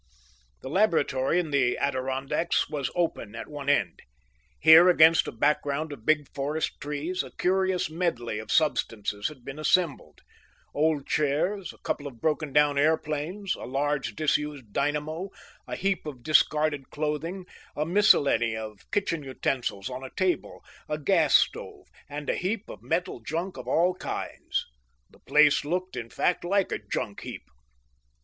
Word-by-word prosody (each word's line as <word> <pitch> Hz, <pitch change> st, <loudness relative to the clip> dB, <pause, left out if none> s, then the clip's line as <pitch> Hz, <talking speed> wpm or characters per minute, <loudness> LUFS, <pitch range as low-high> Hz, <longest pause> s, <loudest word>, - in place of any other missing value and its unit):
The 130 Hz, -, -6 dB
laboratory 160 Hz, -5 st, +2 dB
in 165 Hz, -4 st, -3 dB
the 130 Hz, -3 st, +2 dB
Adirondacks 135 Hz, +4 st, 0 dB
was 145 Hz, -3 st, -3 dB
open 165 Hz, -11 st, -2 dB
at -, -, -6 dB
one 145 Hz, -2 st, -5 dB
end. 100 Hz, -12 st, +1 dB, 0.6 s
Here, 160 Hz, +4 st, +8 dB
against 165 Hz, -1 st, +6 dB
a -, -, -3 dB
background 145 Hz, +4 st, 0 dB
of 115 Hz, -6 st, -13 dB
big 150 Hz, -2 st, +3 dB
forest 145 Hz, +3 st, -2 dB
trees, 150 Hz, +5 st, -2 dB
a -, -, -8 dB
curious 190 Hz, 0 st, +1 dB
medley 155 Hz, -10 st, -2 dB
of 110 Hz, -, -7 dB
substances 105 Hz, -9 st, 0 dB
had 130 Hz, -5 st, -11 dB
been 135 Hz, +2 st, -7 dB
assembled: 165 Hz, -1 st, 0 dB, 0.5 s
old 150 Hz, -1 st, +1 dB
chairs, 160 Hz, +7 st, 0 dB
a -, -, -18 dB
couple 145 Hz, -, -3 dB
of 125 Hz, -5 st, -11 dB
broken 155 Hz, 0 st, -1 dB
down 145 Hz, 0 st, +3 dB
airplanes, 160 Hz, +5 st, 0 dB
a -, -, -7 dB
large 145 Hz, +2 st, -1 dB
disused 150 Hz, -6 st, -1 dB
dynamo, 150 Hz, +6 st, -1 dB, 0.4 s
a -, -, -4 dB
heap 195 Hz, -4 st, -1 dB
of 130 Hz, -5 st, -8 dB
discarded 150 Hz, -2 st, +2 dB
clothing, 155 Hz, +5 st, -3 dB, 0.3 s
a 150 Hz, -, -1 dB
miscellany 145 Hz, -, +4 dB
of 110 Hz, -2 st, -9 dB
kitchen 180 Hz, -6 st, 0 dB
utensils 130 Hz, -6 st, -2 dB
on 130 Hz, 0 st, -6 dB
a 130 Hz, -, -6 dB
table, 185 Hz, +2 st, -2 dB, 0.2 s
a 150 Hz, -, -1 dB
gas 145 Hz, -, +3 dB
stove, -, -, +1 dB, 0.2 s
and 145 Hz, 0 st, -6 dB
a -, -, +1 dB
heap 195 Hz, +3 st, -2 dB
of 105 Hz, -, -11 dB
metal 160 Hz, +4 st, -2 dB
junk 170 Hz, +10 st, -4 dB
of -, -, -9 dB
all 175 Hz, +3 st, +3 dB
kinds. 185 Hz, -, -4 dB, 0.5 s
The -, -, -21 dB
place 150 Hz, -1 st, +4 dB
looked, 180 Hz, +3 st, -3 dB
in 120 Hz, -2 st, -5 dB
fact, 180 Hz, -, 0 dB
like 195 Hz, +2 st, +1 dB
a -, -, -1 dB
junk 100 Hz, 0 st, -4 dB
heap. -, -, -7 dB
150 Hz, 155 wpm, -27 LUFS, 135-170 Hz, 0.6 s, Here